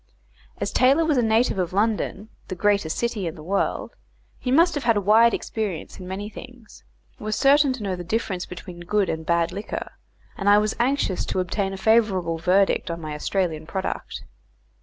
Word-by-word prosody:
As -, -, -2 dB
Taylor 275 Hz, +6 st, +4 dB
was 300 Hz, -5 st, +2 dB
a -, -, +4 dB
native 225 Hz, -2 st, +2 dB
of 180 Hz, 0 st, -2 dB
London, 210 Hz, 0 st, -1 dB, 0.2 s
the 185 Hz, -, -5 dB
greatest 200 Hz, -4 st, +1 dB
city 235 Hz, -6 st, -1 dB
in 165 Hz, -, -5 dB
the 155 Hz, -, -11 dB
world, 195 Hz, +4 st, -1 dB, 0.5 s
he 250 Hz, -, -4 dB
must 335 Hz, +6 st, +4 dB
have 290 Hz, -, -3 dB
had 230 Hz, -2 st, +3 dB
a -, -, +3 dB
wide 220 Hz, +4 st, +5 dB
experience 205 Hz, -9 st, -4 dB
in 180 Hz, -, -8 dB
many 195 Hz, +3 st, -5 dB
things, 245 Hz, +1 st, -12 dB, 0.4 s
was 215 Hz, 0 st, -2 dB
certain 280 Hz, 0 st, +4 dB
to 250 Hz, -4 st, -7 dB
know 190 Hz, -2 st, -2 dB
the 175 Hz, -, -6 dB
difference 185 Hz, -1 st, -2 dB
between 180 Hz, 0 st, -9 dB
good 195 Hz, +2 st, 0 dB
and 160 Hz, 0 st, -4 dB
bad 170 Hz, -1 st, +2 dB
liquor, 205 Hz, +2 st, -5 dB, 0.4 s
and 200 Hz, 0 st, 0 dB
I 205 Hz, -, +7 dB
was 215 Hz, +1 st, +1 dB
anxious 245 Hz, -6 st, +1 dB
to -, -, -1 dB
obtain 195 Hz, +2 st, -1 dB
a 195 Hz, -, -5 dB
favourable 190 Hz, -6 st, +2 dB
verdict 185 Hz, +3 st, +2 dB
on 170 Hz, 0 st, -4 dB
my 155 Hz, -2 st, -6 dB
Australian 160 Hz, 0 st, -2 dB
product. 190 Hz, +1 st, -4 dB
200 Hz, 190 wpm, -24 LUFS, 180-230 Hz, 0.5 s, I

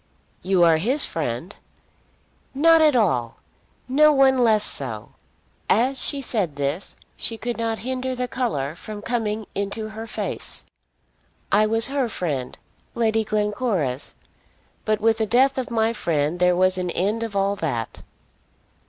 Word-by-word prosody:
"You 185 Hz, -1 st, +2 dB
are 165 Hz, -2 st, +5 dB
his 255 Hz, -, +2 dB
friend." 155 Hz, -, -4 dB, 1.0 s
"Not 325 Hz, +3 st, +5 dB
at 305 Hz, -3 st, +4 dB
all! 130 Hz, -, +1 dB, 0.5 s
No 300 Hz, +4 st, +5 dB
one 270 Hz, -2 st, +4 dB
less 220 Hz, -3 st, +4 dB
so!" 115 Hz, -6 st, -1 dB, 0.6 s
As 255 Hz, +6 st, +2 dB
she 280 Hz, -2 st, -2 dB
said 195 Hz, -, -2 dB
this 145 Hz, +5 st, -3 dB, 0.2 s
she 225 Hz, -, -2 dB
could 240 Hz, +2 st, -4 dB
not 225 Hz, -1 st, -1 dB
hinder 260 Hz, 0 st, -2 dB
the 250 Hz, 0 st, -2 dB
colour 155 Hz, -, -2 dB
from 205 Hz, +3 st, -8 dB
coming 220 Hz, -2 st, -2 dB
into 200 Hz, +2 st, -3 dB
her 220 Hz, +1 st, -8 dB
face. -, -, -5 dB, 0.9 s
"I 215 Hz, +1 st, +4 dB
was 225 Hz, +3 st, +2 dB
her 275 Hz, -3 st, -1 dB
friend, 145 Hz, -, -3 dB, 0.4 s
Lady 225 Hz, -1 st, +1 dB
Glencora's; 210 Hz, -, -2 dB, 0.7 s
but 215 Hz, -1 st, +1 dB
with 225 Hz, +1 st, +2 dB
the 220 Hz, -, 0 dB
death 265 Hz, +4 st, +3 dB
of 255 Hz, -, -4 dB
my 225 Hz, -1 st, +1 dB
friend 160 Hz, -4 st, -1 dB
there 180 Hz, 0 st, +3 dB
was 185 Hz, +1 st, +3 dB
an 180 Hz, -1 st, -2 dB
end 205 Hz, +6 st, -1 dB
of 225 Hz, -3 st, -4 dB
all 200 Hz, 0 st, +1 dB
that." 120 Hz, -, -3 dB
215 Hz, 145 wpm, -23 LUFS, 180-245 Hz, 1.0 s, are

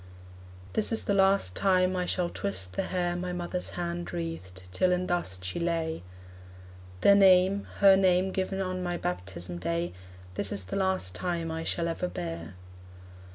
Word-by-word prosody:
This 220 Hz, -, 0 dB
is 225 Hz, -, 0 dB
the 200 Hz, -, 0 dB
last 195 Hz, -, +3 dB
time 185 Hz, -1 st, +3 dB
I 180 Hz, -1 st, -1 dB
shall 175 Hz, -2 st, 0 dB
twist 95 Hz, -, -2 dB
the -, -, 0 dB
hair 175 Hz, -1 st, -1 dB
My 180 Hz, 0 st, -3 dB
mother's 180 Hz, +1 st, -3 dB
hand 175 Hz, 0 st, -3 dB
wreathed, 165 Hz, -, -6 dB
till 180 Hz, -, +2 dB
in 180 Hz, 0 st, +1 dB
dust 95 Hz, -, -2 dB
she 90 Hz, -, -3 dB
lay: 165 Hz, -, -1 dB, 1.0 s
The 200 Hz, -, +7 dB
name, 195 Hz, 0 st, +5 dB
her 195 Hz, -1 st, +8 dB
name 190 Hz, 0 st, +3 dB
given 190 Hz, +1 st, -2 dB
on 185 Hz, -1 st, -2 dB
my 175 Hz, -1 st, -2 dB
baptism 90 Hz, -, -4 dB
day, 85 Hz, 0 st, -2 dB, 0.4 s
This -, -, -1 dB
is 100 Hz, -, -2 dB
the 90 Hz, -, -5 dB
last 190 Hz, -, 0 dB
time 170 Hz, -, -2 dB
I 160 Hz, 0 st, -3 dB
shall 170 Hz, +1 st, -1 dB
ever 170 Hz, +2 st, -2 dB
bear. 85 Hz, -, -6 dB
175 Hz, 165 wpm, -29 LUFS, -, 1.0 s, her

